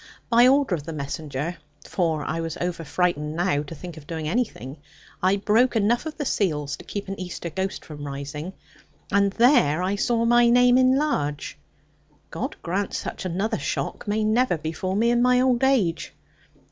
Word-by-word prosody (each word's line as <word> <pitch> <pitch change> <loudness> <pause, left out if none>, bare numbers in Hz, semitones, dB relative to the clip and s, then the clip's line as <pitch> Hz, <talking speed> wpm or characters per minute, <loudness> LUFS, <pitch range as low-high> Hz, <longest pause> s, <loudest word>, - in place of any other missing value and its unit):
By 240 +2 +7
order 270 -5 +3
of 165 - -1
the 165 +2 -6
messenger 150 +2 -4 0.3
(for 160 -5 -1
I 160 - -2
was 165 -1 -4
over 175 -2 -3
frightened 155 -2 -1
now 175 -4 +1
to 150 +3 -8
think 170 +1 -9
of 150 -2 -12
doing 160 -2 -4
anything), 160 - -2 0.4
I 185 +2 +3
broke 220 +5 +2
enough 230 +7 +1
of 310 - -6
seals 150 -8 0
to - - -13
keep 200 -1 -5
an 195 +1 -5
Easter 175 -2 -5
ghost 190 +3 -3
from 145 -2 -9
rising; 145 +5 -6 0.6
and 200 0 +3
there 230 - +4
I 190 +2 0
saw 230 +2 +1
my 240 0 +5
name 245 +1 +5
in 260 +1 +4
large; 150 - -1 0.8
God - - -4
grant 195 +4 -2
such - - -5
another 200 +5 -1
shock - - -3
may 215 +1 0
never 220 -2 +2
befall 160 +5 -3
me 230 +3 +3
in 240 0 +2
my 250 0 +4
old 255 -1 +2
age. 220 -12 +1
185 Hz, 175 wpm, -24 LUFS, 160-235 Hz, 0.8 s, By